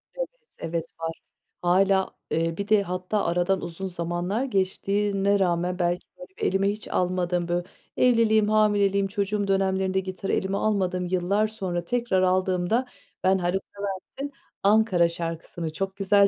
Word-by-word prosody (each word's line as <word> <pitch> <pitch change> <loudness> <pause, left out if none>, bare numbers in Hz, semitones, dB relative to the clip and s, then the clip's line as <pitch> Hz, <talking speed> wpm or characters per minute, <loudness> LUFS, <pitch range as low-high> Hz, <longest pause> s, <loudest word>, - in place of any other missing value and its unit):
Evet, - - -2 0.3
evet, 165 0 -2
var. 165 0 -4 0.4
Hâlâ 190 +2 +3 0.2
eee, 165 +1 0
bir 200 0 -3
de 215 -2 +4
hatta 185 +3 -2
aradan 180 +2 +1
uzun 175 +3 -5
zamanlar 175 +5 -2
geçtiğine 200 -1 +1
rağmen 180 0 +1
belki, 175 +1 0
böyle, 270 - -10
bir 450 - -7
elime 195 +1 +2
hiç 210 +1 -7
almadım. 180 -1 0
Bö 175 0 +1 0.4
evliliğim, 220 -4 +4
hamileliğim, 205 -2 +3
çocuğum 205 0 -1
dönemlerinde 190 -1 +1
gitarı 190 +1 -4
elime 195 +1 0
almadım. 185 -4 0
Yıllar 190 +4 +2
sonra 185 -5 -3
tekrar 235 -4 +1
aldığımda 185 +5 +2 0.4
ben 190 +1 +4
Haluk 180 +1 -1 0.2
Levent'in 200 +8 -5 0.3
"Ankara" 200 -5 +4
şarkısını 165 -1 -5
çok 190 +3 -3
güzel 200 0 +5
190 Hz, 140 wpm, -26 LUFS, 175-205 Hz, 0.4 s, güzel